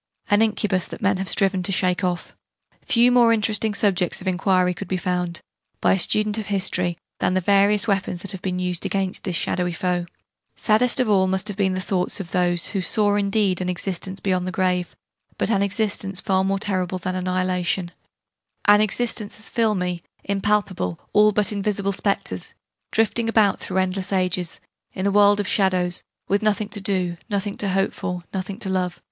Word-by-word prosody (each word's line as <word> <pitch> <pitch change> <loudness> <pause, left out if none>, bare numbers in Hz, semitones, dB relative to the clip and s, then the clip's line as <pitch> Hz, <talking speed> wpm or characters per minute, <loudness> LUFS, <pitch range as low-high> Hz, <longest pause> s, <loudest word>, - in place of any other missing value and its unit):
an 205 +1 +5
incubus 210 -4 +1
that - - -9
men 200 -1 +2
have 190 0 -3
striven 195 -2 +1
to 180 - -1
shake 185 0 0
off. 180 -1 -2 0.5
Few 240 0 +5
more 240 -2 +5
interesting 215 -1 +1
subjects 190 -4 +1
of 190 - -8
enquiry 185 0 +2
could 195 +3 -7
be 185 - -1
found, 180 -2 -2 0.4
by - - +3
a 190 - +1
student 215 +3 +2
of 215 - -5
history, 180 -3 -1 0.2
than 185 - +1
the - - +3
various 200 +2 +3
weapons 190 -3 -1
that 200 - -1
have 190 -3 -7
been 185 -1 -2
used 180 -1 -2
against 195 -2 -2
this 185 -3 -2
shadowy 180 +1 -1
foe. 180 -1 -1 0.5
Saddest 235 +4 +2
of 255 - +2
all 195 -3 +3
must 190 +2 0
have 200 - -6
been 190 -2 +1
the - - -2
thoughts 185 0 -1
of 185 -3 -7
those 175 -2 +1
who 195 - -2
saw 205 +2 +1
indeed 200 -2 +1
an 180 - -2
existence 190 +1 -3
beyond 185 -2 -1
the - - -2
grave, 180 -1 -1 0.4
but - - 0
an 200 -3 +2
existence 200 -1 0
far 190 -2 +1
more 195 +1 0
terrible 185 -2 -1
than 185 +1 -3
annihilation 185 -1 -1 0.7
an 205 0 +6
existence 215 0 0
as 215 - 0
filmy, 185 -6 0 0.2
impalpable, 200 - -1
all 210 0 +6
but 210 0 +1
invisible 200 -1 -1
spectres, 185 - -2 0.4
drifting 225 +1 +1
about, 215 -3 +3
through 190 - -4
endless 190 +1 -1
ages, 180 -2 -1 0.3
in 185 - -3
a 200 - +2
world 205 0 +5
of 205 - -1
shadows, 185 -3 +1 0.3
with 200 +1 +1
nothing 215 -1 0
to 205 -1 -4
do, 185 -3 0
nothing 200 -1 -2
to 200 - -2
hope 195 +1 +1
for, 180 -2 -4
nothing 190 0 -4
to 215 - -4
love! 185 -2 -1
190 Hz, 190 wpm, -22 LUFS, 180-205 Hz, 0.7 s, an